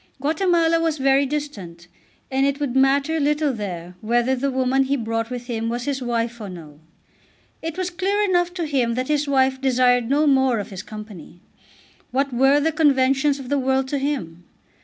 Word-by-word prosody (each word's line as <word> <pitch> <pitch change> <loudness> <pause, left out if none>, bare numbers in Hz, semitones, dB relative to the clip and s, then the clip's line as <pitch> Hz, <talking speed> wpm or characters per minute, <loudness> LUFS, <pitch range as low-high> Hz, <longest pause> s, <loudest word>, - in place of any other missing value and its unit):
Guatemala 330 +2 +2
was 325 -2 0
very 270 0 +3
distant, 200 - -6 0.4
and 265 +1 +1
it 280 +1 0
would 280 -4 -2
matter 275 +4 +2
little 295 -1 +1
there 180 -5 -6
whether 240 +4 +1
the 275 +2 -1
woman 265 +1 +1
he 275 +1 0
brought 225 -1 -2
with 245 -1 -6
him 230 -2 -3
was 240 +1 -3
his 275 -1 -2
wife 235 -1 -2
or 205 - -6
no. 155 -5 -11 0.8
It 325 +1 -5
was 365 -1 -2
clear 390 +3 -1
enough 355 -3 +1
to 345 -3 -2
him 255 -6 0
that 255 +2 -3
his 295 -1 +1
wife 265 -1 +2
desired 250 -2 +2
no 290 +3 +3
more 265 -4 +3
of 205 - -5
his 190 -1 -6
company. 210 -6 -11 0.7
What 275 +1 -1
were 270 +4 +4
the 320 +2 +1
conventions 275 -2 +2
of 265 -3 -9
the 285 0 +1
world 265 0 0
to 285 - -1
him? 175 - -3
265 Hz, 185 wpm, -22 LUFS, 235-290 Hz, 0.8 s, were